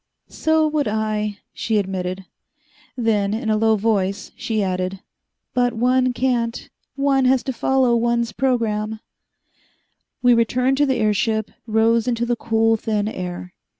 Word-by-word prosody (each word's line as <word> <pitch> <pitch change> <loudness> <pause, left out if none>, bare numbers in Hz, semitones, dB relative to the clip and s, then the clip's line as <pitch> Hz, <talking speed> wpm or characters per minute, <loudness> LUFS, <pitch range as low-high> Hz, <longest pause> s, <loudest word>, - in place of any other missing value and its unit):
"So 315 0 +1
would 300 -2 0
I," 215 -1 -1 0.2
she 220 -2 -1
admitted. 190 -1 -3 0.7
Then, 215 -4 +1
in 220 -1 -2
a - - +3
low 220 +1 +3
voice, 200 -2 -1
she 220 -2 -1
added, 185 0 -2 0.5
"But 245 -1 +1
one 255 +2 +2
can't. 240 -2 -1 0.3
One 275 -1 +2
has 255 0 +3
to 265 - -3
follow 255 0 +2
one's 235 0 +1
program." 220 -4 -1 1.2
We 245 0 +6
returned 250 +3 +2
to 290 0 +3
the 265 - +1
airship, 220 0 0
raid - - -28 0.3
rose 230 +1 +2
into 235 -1 0
the 240 0 0
cool, 225 0 +1
thin 215 -1 -1
air. 180 -3 -6
225 Hz, 145 wpm, -21 LUFS, 210-250 Hz, 1.2 s, We